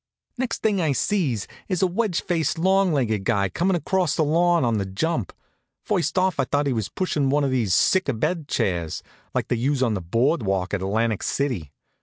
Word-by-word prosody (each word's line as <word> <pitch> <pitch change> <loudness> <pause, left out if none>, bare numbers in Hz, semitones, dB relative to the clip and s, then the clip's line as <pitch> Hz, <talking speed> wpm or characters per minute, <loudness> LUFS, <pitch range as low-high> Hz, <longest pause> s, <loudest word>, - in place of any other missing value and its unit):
Next 250 -1 -3
thing 205 -4 +2
I 155 -4 +1
sees 135 - 0 0.2
is 185 -1 0
a - - +6
wedge 185 0 0
faced, 165 -2 0
long 190 +2 +3
legged 110 -9 0
guy 100 -2 +1
comin' 180 - +1
across 180 -1 0
the 160 - +2
lawn 170 0 +3
on 115 -3 +1
the 100 - -2
jump. 160 - -2 0.5
First 195 -4 -1
off 185 -4 +1
I 135 - +3
thought 145 +2 0
he 140 - +1
was 110 -4 -2
pushin' 150 -7 -1
one 145 +2 +2
of 135 - 0
these 115 -8 +1
sick 190 -5 +3
abed 145 +6 -1
chairs, 85 - -1 0.3
like - - -1
they 120 - +1
use 130 +3 +1
on 115 -3 +1
the 95 - -2
board 120 - +1
walk 95 -2 -1
at 100 - -1
Atlantic 110 +2 0
City. 120 - -2
140 Hz, 205 wpm, -23 LUFS, 110-175 Hz, 0.5 s, a